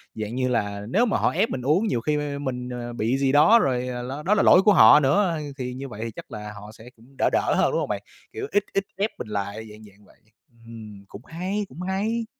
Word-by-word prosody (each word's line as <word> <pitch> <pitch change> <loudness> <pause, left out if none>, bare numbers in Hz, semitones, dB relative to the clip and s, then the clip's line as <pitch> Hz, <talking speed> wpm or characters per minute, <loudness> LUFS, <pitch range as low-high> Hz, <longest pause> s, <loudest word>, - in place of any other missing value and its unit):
dạng 110 +1 -5
như 130 0 0
là, 105 -4 -2
nếu 225 - +3
mà 225 - 0
họ - - +1
ép 225 - 0
mình 130 - -4
uống 155 - +1
nhiều 120 - -1
khi 150 +4 0
m 145 -1 -4
mình, 125 -1 -4
ờ, 120 -1 -6
bị 120 +3 -1
gì 135 -1 +1
đó 155 +12 +6
rồi 125 - 0 0.2
ló 135 +4 -6
đó 195 - +2
là 210 - +2
lỗi 180 - +7
của 210 +1 +5
họ 150 -3 +8
nữa, 165 +4 +2 0.2
thì 125 -2 -4
như 135 +2 -7
vậy 115 0 -6
chắc - - -11
là 105 -1 -7
họ 105 +1 -11
sẽ 110 +2 -14
cũng 115 - -21
đỡ - - +2
đỡ - - +1
hơn, - - +2
đúng - - 0
hông - - -3
bạn? - - -2 0.3
Kiểu, 425 -1 -5
ít 205 - +2
ít 195 - +1
ép 205 +3 0
mình - - -7
lại, 105 +1 -5
dạng 105 +1 -14
dạng 105 0 -18
vậy, - - -23 0.5
ừm, 110 -3 -11
cũng 100 - -11
hay, 190 +5 -3
cũng 150 +7 -10
hay. 210 +5 -2
130 Hz, 255 wpm, -24 LUFS, 110-180 Hz, 0.5 s, họ